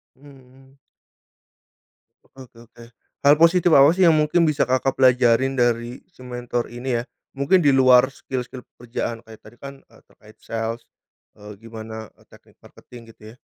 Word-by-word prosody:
Hmm 140 0 -18
hmm. 130 +1 -22 1.5
Oke - - -29
oke 120 - -23
oke. 120 0 -17 0.4
Hal 145 +1 +6
positif 170 +2 +3
apa 140 +2 +6
sih 185 0 +1
yang 160 - +4
mungkin 155 +2 +1
bisa 150 - 0
Kakak 130 +1 -1
pelajarin 130 0 +2
dari 120 +1 -1
si - - -25
mentor 120 -1 -5
ini 120 0 -4
ya? 120 - -8 0.3
Mungkin 140 +7 +2
di 145 - +1
luar 130 -1 +5
skill-skill 130 -2 -8
pekerjaan 115 -1 -7
kayak 110 -1 -15
tadi 110 +2 -16
kan, 140 0 -9
eee, - - -23
terkait 110 0 -21
sales, 115 +1 -6 0.5
eee, 105 0 -12
gimana, 110 -1 -10
eee, - - -26
teknik - - -21
marketing 115 -2 -16
gitu 110 - -27
ya. - - -25
125 Hz, 165 wpm, -21 LUFS, 115-135 Hz, 1.5 s, Hal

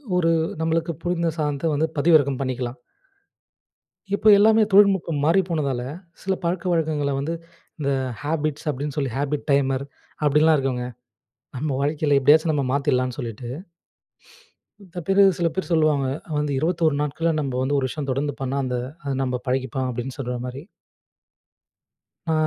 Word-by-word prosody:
ஒரு 165 -2 +3 0.3
நம்மளுக்கு 165 +1 0
புரிந்த 170 -1 0
சாதன்த்த 150 +1 -1
வந்து 155 +2 +1
பதிவிறக்கம் 145 -3 +4
பண்ணிக்கலாம். 130 -1 -3 1.4
இப்போ 210 - 0
எல்லாமே 220 +2 +5
தொழில்நுட்பம் 190 -7 +4
மாறி 170 +5 +4
போனதால, 140 -6 -1 0.4
சில 190 - 0
பழக்கவழக்கங்கள 165 -4 0
வந்து, 150 +4 -2 0.5
இந்த 140 -2 0 0.3
"ஹேபிட்ஸ்" 155 0 -2
அப்டின்னு 145 0 -3
சொல்லி 135 -4 -1
"ஹாபிட் 145 +1 -2
டைமர்" 135 -1 +2 0.4
அப்டின்லாம் 150 +2 +4
இருக்குங்க. 130 -3 -1 0.7
நம்ம 150 +4 -2
வாழ்க்கையில 145 0 +1
எப்டியாச்சும் 155 +4 +4
நம்ம 145 -2 0
மாத்திட்லான்னு 130 -3 0
சொல்லிட்டு. 120 -1 -6 1.3
மித்த 180 -2 -8
பேரு 195 +1 +5 0.2
சில 170 -1 +2
பேரு 190 -1 -3
சொல்லுவாங்க. 155 -4 +3 0.3
வந்து 150 -1 -1
21 165 0 +1
நாட்கள்ல 160 +3 0
நம்ப 135 -3 -3
வந்து 140 +2 +1
ஒரு 130 - +1
விஷயம் 140 -1 -4
தொடர்ந்து 140 +2 -1
பண்ணா, 135 +1 -1
அந்த 125 -1 -2 0.3
"அது 140 -1 -2
நம்ப 125 -1 -2
பழகிப்போம்" 130 0 -1
அப்டின்னு 125 +3 -5
சொல்ற 125 -2 -3
மாரி. 130 +3 -7 1.7
ஆ. 160 - +1
145 Hz, 135 wpm, -23 LUFS, 135-165 Hz, 1.7 s, எல்லாமே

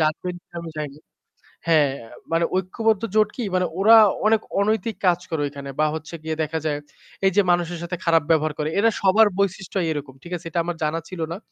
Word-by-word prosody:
জানবেন 160 +3 0
কিনা 175 - -15
আমি 165 - -7
জানি 150 -2 -4
না। 155 - -19 0.7
হ্যাঁ, 150 -4 +4 0.4
মানে 165 0 +2
ঐক্যবদ্ধ 215 +3 0
জোট 215 -1 +4
কি? 245 - -3
মানে 185 0 +2
ওরা 220 +3 +7 0.3
অনেক 220 0 +3 0.2
অনৈতিক 215 +1 0
কাজ 175 -1 +4
করে 160 -3 -1
ওইখানে 140 -1 -8
বা 155 - +4
হচ্ছে 160 +1 -8
গিয়ে 160 0 -2
দেখা 160 +1 -2
যায় 145 -1 0 0.5
এই 195 - +5
যে 205 - +6
মানুষের 175 -1 0
সাথে 175 +1 -3
খারাপ 165 -2 +4
ব্যবহার 155 -1 +2
করে। 150 - 0
এরা 230 - +5
সবার 210 +3 +5
বৈশিষ্ট্যই 190 -2 -1
এরকম। 145 -3 -5
ঠিক 175 - -11
আছে? 170 - -9
এটা 170 - -1
আমার 175 0 -3
জানা 155 +2 0
ছিল 185 - -8
না। 175 - -5
170 Hz, 210 wpm, -23 LUFS, 155-195 Hz, 0.7 s, ওরা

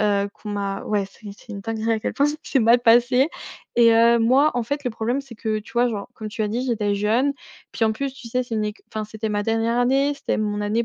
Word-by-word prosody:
heu, 200 -1 +1
qu'on 210 - -8
m'a 200 -1 -3
ouais, 205 -2 0
c'est 205 +1 -12
c'est - - -16
une 200 - -6
dinguerie 225 +2 -2
à 220 - -1
quel - - -2
point 285 - +2
ça 295 +1 -1
s'est 270 - 0
mal 235 +2 +5
passé! 245 +4 +4 0.5
Et, 235 -1 +6
heu, 235 +1 +5
moi 260 +6 +4
en 245 - 0
fait 285 +4 -3
le 250 - 0
problème 235 +5 -1
c'est 270 -4 -12
que 215 -1 -2
tu 210 - -15
vois 240 +1 +3
genre, 205 -4 -5
comme 215 -2 -6
tu 220 +1 -3
as 210 - 0
dit 235 +4 -2
j'étais 210 -4 0
jeune 225 +7 +1 0.4
puis 225 - 0
en 220 - +3
plus 275 +4 -3
tu 250 -4 -10
sais 250 +2 0
c'est 240 - -5
une 215 -1 0
éc 210 0 -5
enfin 215 0 -3
c'était 220 +1 -5
ma 205 0 0
dernière 225 +2 0
année. 270 +3 +2
C'était 280 - -2
mon 210 -1 -1
année 215 +3 0
225 Hz, 270 wpm, -23 LUFS, 210-245 Hz, 0.5 s, Et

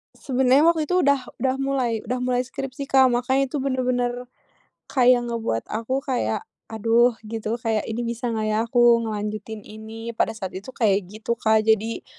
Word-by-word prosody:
Sebenarnya 265 +1 +3
waktu 325 -2 +1
itu 360 - 0
udah 280 -1 +4 0.2
udah 260 0 +1
mulai 270 -3 0
udah 250 +2 -2
mulai 250 0 +1
skripsi, 270 0 -6
Kak, 265 -2 +5
makanya 260 +2 +1
itu 295 - -2
bener-bener 255 -2 0 0.8
kayak 250 -2 +4
ngebuat 225 - -2
aku 255 +5 -2
kayak, 245 -6 -1 0.2
aduh, 230 +2 +2
gitu 220 +1 -3
kayak 225 -3 -2
ini 225 +2 -3
bisa 235 +1 -3
enggak 220 -2 -1
ya - - +1
aku 240 -1 +5
ngelanjutin 215 0 -5
ini? 220 +2 -8
Pada 225 - 0
saat 190 -3 -5
itu 195 +7 -8
kayak 200 -5 +1
gitu, 215 +3 -4
Kak. 220 0 +3
Jadi, 220 +1 +1
235 Hz, 165 wpm, -23 LUFS, 220-260 Hz, 0.8 s, Kak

